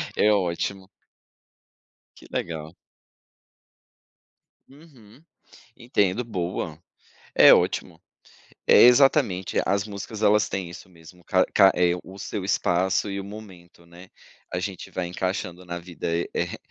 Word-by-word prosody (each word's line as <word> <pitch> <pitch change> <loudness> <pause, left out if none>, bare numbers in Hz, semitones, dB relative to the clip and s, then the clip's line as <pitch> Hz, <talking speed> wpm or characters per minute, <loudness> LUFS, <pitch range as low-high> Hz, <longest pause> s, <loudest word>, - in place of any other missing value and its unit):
É 105 - +3
ótimo. 95 0 -2 1.3
Que - - -16
legal. 80 -1 -5 1.9
Uhum. 135 -4 -19 0.5
Entendo. 115 -2 0
Boa. 90 -6 -4 0.6
É - - +8
ótimo. - - +1 0.7
É, - - +7
exatamente, 125 -7 +4
as 100 +1 0
músicas, 105 +1 -7
elas 105 0 +3
têm 95 -3 -4
isso 85 +2 -12
mesmo, 85 0 -17
ca 95 +1 +2
ca 95 0 +6
é, 90 -1 +2
o 95 +1 -12
seu 100 0 -5
espaço 95 +1 0
e 100 - -4
o - - -6
momento, 95 -5 -13
né. 85 +2 -15 0.4
A 90 - -1
gente 95 0 -6
vai 90 - -3
encaixando 90 0 -4
na 85 0 -5
vida 85 -1 -5
e, 85 +1 -2
eh, - - -3
95 Hz, 125 wpm, -24 LUFS, 85-105 Hz, 1.9 s, É